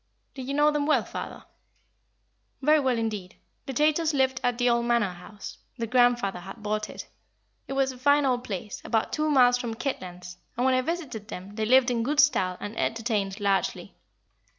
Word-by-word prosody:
"Did 260 -2 -7
you 275 - -2
know 295 +1 +4
them 295 -1 -1
well, 310 - +3
father?" - - -7 1.2
"Very 305 +2 +5
well, 260 -4 +1
indeed. 210 -5 -3 0.3
The 270 - -3
Chaytors 310 +3 +2
lived 265 -2 +1
at 245 -1 +1
the 245 0 +2
old 235 0 +2
Manor 235 -6 +2
House 190 +4 -10 0.2
their 230 - -2
grandfather 240 -5 +2
had 195 +5 -10
bought 215 0 -2
it. - - -8 0.6
It - - -4
was 270 -1 +1
a 255 - -12
fine 285 +2 +4
old 250 -2 +1
place, 200 -2 -6
about 225 -1 -1
two 305 0 0
miles 250 -3 +5
from 235 -2 -4
Kitlands, 180 -9 -5 0.2
and 245 - +1
when 260 - +4
I 255 - +3
visited 260 -9 -4
them 190 0 -8
they 215 0 -2
lived 255 +2 +5
in 235 -1 0
good 290 +5 0
style 185 -12 +3
and 205 +2 -6
entertained 215 -3 -1
largely. 200 -1 -1
240 Hz, 190 wpm, -27 LUFS, 210-270 Hz, 1.2 s, Very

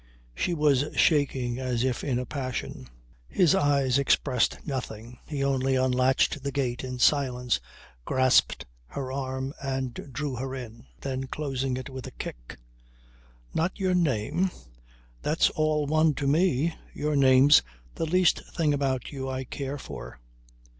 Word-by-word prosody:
She 170 - -1
was 145 -3 +3
shaking 130 -5 +2
as 125 -2 -1
if 130 -2 -1
in 130 -4 0
a 125 - -2
passion. 130 - -5 0.4
His 170 - +4
eyes 140 -2 +3
expressed 135 -2 +2
nothing; 120 -4 -5
he 145 -3 -2
only 135 -1 +1
unlatched 130 +2 +2
the 140 +1 -3
gate 130 -3 -2
in 125 -1 -5
silence, 125 -2 +2 0.4
grasped 130 - +3 0.2
her 130 - -5
arm 130 0 -3
and 135 -2 -2 0.2
drew 140 -1 -3
her 130 +2 -4
in. 115 - -9
Then 135 -1 -3
closing 135 -3 -2
it 130 - -6
with 130 -2 -7
a - - -8
kick - - -7 1.0
"Not 170 +4 0
your 190 -1 +1
name? 170 - +1 0.7
That's 155 +2 +2
all 155 -1 +1
one 155 +1 +3
to 140 - -3
me. 160 +1 +2 0.2
Your 150 0 -1
name's 135 +1 +7 0.3
the 165 - -2
least 180 +1 +3
thing 155 -4 +2
about 135 -3 -1
you 135 -2 -4
I 130 0 -3
care 140 +2 -5
for." - - -9
135 Hz, 145 wpm, -27 LUFS, 130-145 Hz, 1.0 s, name's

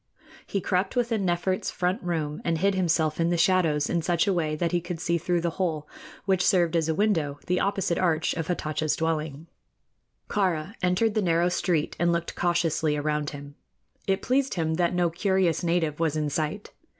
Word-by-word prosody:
He 200 - -2
crept 185 +4 0
within 230 -5 0
Nefert's 175 +2 0
front 180 +2 -1
room 160 -4 -2
and 165 -1 0
hid 195 +4 +2
himself 165 -4 +1
in 165 0 +2
the 175 - +1
shadows 165 -4 +3
in 170 - 0
such 170 +2 +1
a 200 - +2
way 155 -3 0
that 170 +2 -1
he 175 -1 +1
could 170 -1 -5
see 170 0 0
through 175 +1 0
the 170 0 -1
hole, 155 -5 -1 0.4
which 190 -2 +2
served 175 -4 +3
as 165 -1 +1
a 160 - +1
window, 165 -8 +1
the 180 0 +1
opposite 195 -3 0
archway 165 -2 +1
of 160 - -3
Hatatcha's 155 -3 -1
dwelling. 155 -2 -2 0.8
Kāra 185 -3 0
entered 180 +5 +2
the 215 - +1
narrow 170 -1 +2
street 170 -3 0
and 170 +1 +3
looked 170 0 -1
cautiously 165 -3 +1
around 150 0 -1
him. 145 0 -9 0.5
It 195 0 0
pleased 270 +1 +1
him 160 -2 0
that 175 +1 +1
no 175 -1 +2
curious 185 -1 +1
native 165 -3 0
was 160 -2 +1
in 150 -1 -1
sight. 155 +7 -3
170 Hz, 190 wpm, -26 LUFS, 155-185 Hz, 0.8 s, shadows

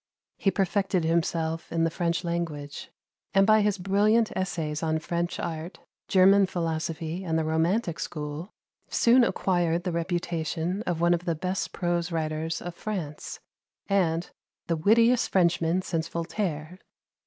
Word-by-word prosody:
He 195 - +3
perfected 195 -2 +1
himself 165 0 -1
in 165 0 +1
the 165 - +1
French 170 +1 -1
language, 165 -4 -4 0.5
and 195 0 +6
by 215 0 +5
his 205 -1 +1
brilliant 210 +4 +2
essays 160 -5 -2
on 160 -1 +1
French 170 +2 -2
art, 165 +1 -5 0.3
German 195 +1 +5
philosophy, 165 0 -3
and 160 -3 0
the 160 - +1
Romantic 170 +4 0
School, 150 +4 -5 0.4
soon 245 +2 +5
acquired 175 -6 +1
the 180 - -1
reputation 170 +1 -2
of 170 -2 -1
one 170 0 +4
of 175 +1 -2
the 170 -3 0
best 185 +4 -2
prose 175 -1 -1
writers 160 0 -2
of 175 - -5
France, 170 -7 -5 0.4
and 175 -4 +1 0.3
the 170 - 0
"wittiest 230 +8 +4
Frenchman 175 -1 +2
since 165 -2 -2
Voltaire." 170 -1 -3
170 Hz, 140 wpm, -27 LUFS, 160-190 Hz, 0.5 s, and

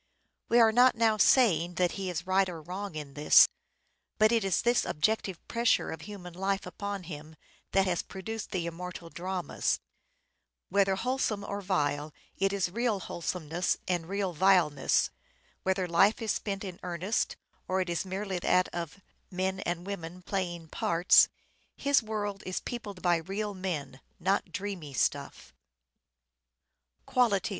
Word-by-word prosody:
We 240 - +5
are 225 -1 +7
not 245 +3 +5
now 225 -1 +3
saying 180 - +4
that 180 0 +2
he 195 -2 -4
is 175 0 -4
right 190 0 +2
or 170 -2 -6
wrong 180 +3 -6
in 145 -3 -6
this; 150 +1 +7 0.7
but 215 0 +5
it 230 -2 +3
is 195 -2 +1
this 240 0 +3
objective 190 +2 -1
pressure 235 0 +2
of 160 - -6
human 180 -1 -9
life 195 +2 -1
upon 200 -2 -5
him 155 -2 -9 0.4
that 195 0 +4
has 180 -2 0
produced 220 +4 -6
the 180 -4 -2
immortal 170 0 -7
dramas; 180 0 -2 0.9
whether 195 0 +3
wholesome 230 -2 -1
or 200 0 -4
vile 150 -5 -1 0.2
it 195 0 +1
is 195 -3 0
real 230 -1 0
wholesomeness 175 -1 -2
and 175 -2 -1
real 195 -2 -1
vileness; 170 -5 +3 0.5
whether 190 -1 0
life 195 +5 +4
is 225 -3 -1
spent 195 -1 -3
in 185 -2 -7
earnest, 180 +4 -1 0.3
or 190 +1 +1
is 175 -2 -2
merely 190 0 -3
that 180 +1 +2
of 170 +3 -5
" - - -42
men 190 +1 -2
and 175 -1 -3
women 180 -2 -6
playing 175 -4 -3
parts," 170 +3 +5 0.5
his 280 -1 +3
world 205 -2 -3
is 185 - -2
peopled 205 -6 -7
by 175 -1 +4
real 200 +5 -3
men; 175 -8 -4 0.2
not 190 0 0
dreamy 185 -6 -5
stuff. - - -1
190 Hz, 150 wpm, -30 LUFS, 175-200 Hz, 0.9 s, are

